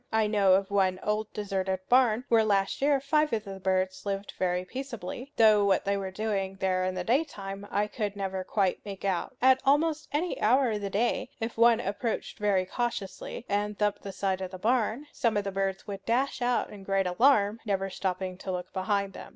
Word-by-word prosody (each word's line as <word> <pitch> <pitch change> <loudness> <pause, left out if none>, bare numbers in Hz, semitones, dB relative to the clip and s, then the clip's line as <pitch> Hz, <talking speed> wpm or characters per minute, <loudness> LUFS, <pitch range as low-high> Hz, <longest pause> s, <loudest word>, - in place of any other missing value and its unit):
I 220 -1 +3
know 205 -3 +4
of 195 +1 -1
one 190 -2 +2
old 215 0 -1
deserted 190 -2 -2
barn 245 -1 +4
where 225 -1 +4
last 200 0 +1
year 280 0 +3
five 300 +2 +1
of 215 -1 0
the 195 -2 -8
birds 185 0 0
lived 200 0 -4
very 180 0 0
peaceably; 255 +2 -6
though 215 -2 +6
what 195 -1 +2
they 200 0 +1
were 195 -1 -3
doing 195 -1 -2
there 185 -1 0
in 185 0 -2
the 180 - -2
daytime 205 - -2
I 205 +1 +1
could 210 -1 -3
never 190 -1 -3
quite 190 -1 0
make 200 -1 -7
out. 195 +6 -1
At 260 0 +6
almost 305 +3 +2
any 325 +5 -1
hour 250 +2 +4
of 210 -1 -2
the 200 - -3
day, 215 +5 0
if 225 +1 -3
one 230 0 +5
approached 225 +1 -3
very 200 -3 +2
cautiously 240 - -4
and 205 0 -1
thumped 210 -1 0
the 200 - -6
side 190 0 -1
of 185 - -3
the 185 - -8
barn, 235 +5 0
some 230 -3 +1
of 205 - 0
the 200 - -3
birds 195 0 -2
would 195 -2 -7
dash 255 +3 0
out 245 0 0
in 205 - -10
great 195 0 +1
alarm, 210 +2 +3
never 195 -2 -1
stopping 185 -1 -3
to 190 - -4
look 180 0 -5
behind 200 0 -1
them. - - -9
205 Hz, 210 wpm, -28 LUFS, 190-230 Hz, -, though